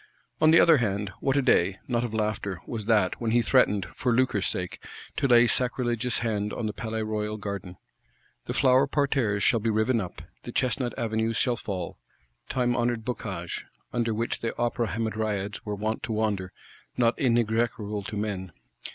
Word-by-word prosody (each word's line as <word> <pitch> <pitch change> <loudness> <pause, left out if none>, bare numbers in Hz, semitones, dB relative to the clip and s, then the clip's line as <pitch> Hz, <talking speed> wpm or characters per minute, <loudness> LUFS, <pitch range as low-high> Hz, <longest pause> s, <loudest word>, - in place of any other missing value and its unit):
On 155 - +6
the 165 - +7
other 165 -2 +7
hand, 100 -4 -1
what 135 0 +1
a 140 - +3
day, 95 -6 +3
not 120 -2 0
of 120 - -3
laughter, 105 -3 -2
was 110 -4 -5
that, 105 -4 +2
when 115 - 0
he 120 +1 +3
threatened, 105 -6 +3
for 125 - 0
lucre's 115 -5 +2
sake, 90 -1 -4 0.3
to 140 - +2
lay 120 -1 +7
sacrilegious 120 0 0
hand 105 -2 -1
on 115 - -3
the 105 - -2
Palais 110 0 -3
Royal 105 0 -2
Garden! 100 -3 -6 0.7
The - - -4
flower 130 0 +4
parterres 135 -8 +1
shall 115 - +4
be 115 +1 0
riven 110 +2 +2
up; 90 - -7 0.2
the - - -7
Chestnut 125 -1 -1
Avenues 110 0 0
shall 125 -2 +2
fall: 95 -6 -5 0.5
time 125 -1 +1
honoured 120 -2 0
boscages, 95 -8 -4 0.3
under 120 -1 0
which 115 +2 -1
the 115 - -3
Opera 120 -1 0
Hamadryads 105 -1 -2
were 105 - -1
wont 110 +2 -2
to 115 - -3
wander, 105 -4 -1 0.5
not 120 -1 +4
inexorable 115 -4 +1
to 105 +2 -6
men. 95 -4 -3
110 Hz, 175 wpm, -27 LUFS, 105-120 Hz, 0.7 s, the